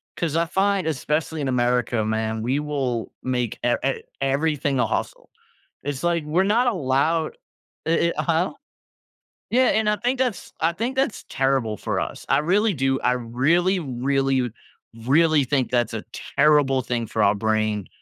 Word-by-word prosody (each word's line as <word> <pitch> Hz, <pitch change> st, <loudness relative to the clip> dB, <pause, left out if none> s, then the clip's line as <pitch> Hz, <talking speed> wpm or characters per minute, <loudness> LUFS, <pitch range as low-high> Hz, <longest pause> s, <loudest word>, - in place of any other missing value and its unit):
'Cause 165 Hz, -2 st, -1 dB
I 170 Hz, -, +2 dB
find, 190 Hz, 0 st, +1 dB
especially 155 Hz, +1 st, -1 dB
in 135 Hz, -, -1 dB
America, 120 Hz, -2 st, +1 dB
man, 110 Hz, 0 st, -1 dB
we 130 Hz, +6 st, 0 dB
will 135 Hz, -6 st, -2 dB
make 125 Hz, -3 st, -1 dB
e 120 Hz, -, +3 dB
e 135 Hz, -, -1 dB, 0.2 s
everything 140 Hz, 0 st, 0 dB
a -, -, +2 dB
hustle. -, -, -4 dB, 0.6 s
It's 140 Hz, -2 st, -3 dB
like 170 Hz, -2 st, +1 dB
we're 160 Hz, +5 st, +2 dB
not 220 Hz, +6 st, +2 dB
allowed 160 Hz, -, +1 dB, 0.5 s
eh 165 Hz, +1 st, +2 dB
eh -, -, +1 dB
huh? 170 Hz, +2 st, +1 dB, 1.0 s
Yeah, 255 Hz, +2 st, +4 dB
and 220 Hz, -1 st, +2 dB
I 210 Hz, -, +3 dB
think 250 Hz, +3 st, -1 dB
that's 250 Hz, -7 st, -2 dB
I 165 Hz, +1 st, +2 dB
think 235 Hz, +8 st, -3 dB
that's 265 Hz, -4 st, -1 dB
terrible 135 Hz, -5 st, 0 dB
for -, -, -2 dB
us, -, -, -6 dB
I -, -, +4 dB
really 195 Hz, +6 st, +2 dB
do. 135 Hz, -1 st, +1 dB
I 125 Hz, -, +3 dB
really, 140 Hz, +11 st, +1 dB
really, 135 Hz, -2 st, 0 dB, 0.6 s
really 155 Hz, +1 st, +4 dB
think 130 Hz, -1 st, 0 dB
that's 120 Hz, -2 st, +1 dB
a 110 Hz, -, -4 dB, 0.3 s
terrible 140 Hz, -2 st, +4 dB
thing 120 Hz, -2 st, -2 dB
for 110 Hz, -, -1 dB
our 100 Hz, 0 st, +4 dB
brain, 110 Hz, -1 st, 0 dB
140 Hz, 165 wpm, -23 LUFS, 125-170 Hz, 1.0 s, Yeah